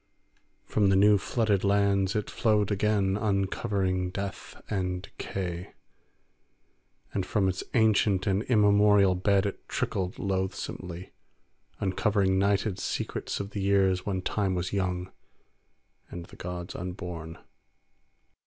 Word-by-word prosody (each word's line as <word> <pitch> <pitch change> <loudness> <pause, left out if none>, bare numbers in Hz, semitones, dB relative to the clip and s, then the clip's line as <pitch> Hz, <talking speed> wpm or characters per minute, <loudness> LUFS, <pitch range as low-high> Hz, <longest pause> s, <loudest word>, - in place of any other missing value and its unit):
From 105 -2 +2
the 95 - +4
new 100 +1 +5
flooded 105 -2 0
lands 100 -1 +2
it 105 - -1
flowed 105 -2 +1
again, 100 -1 +1
uncovering 95 -2 0
death 100 +1 -6
and 90 -3 -2
decay; 90 -3 -5 1.4
and 95 - 0
from 105 -1 +1
its 95 0 -2
ancient 105 -4 +3
and 100 -1 +1
immemorial 105 -3 +5
bed 95 +2 +2
it 100 - -5
trickled 95 -2 -2
loathsomely, 95 -2 -4 0.7
uncovering 95 0 +1
nighted 100 0 +1
secrets - - -3
of 100 0 -5
the 100 - -4
years 95 -2 +2
when 95 -2 -2
Time 95 -2 0
was 90 +1 -3
young 90 -2 -2 1.0
and 85 -1 -7
the - - -15
gods 90 0 -6
unborn. 90 -3 -6
95 Hz, 115 wpm, -28 LUFS, 90-100 Hz, 1.4 s, new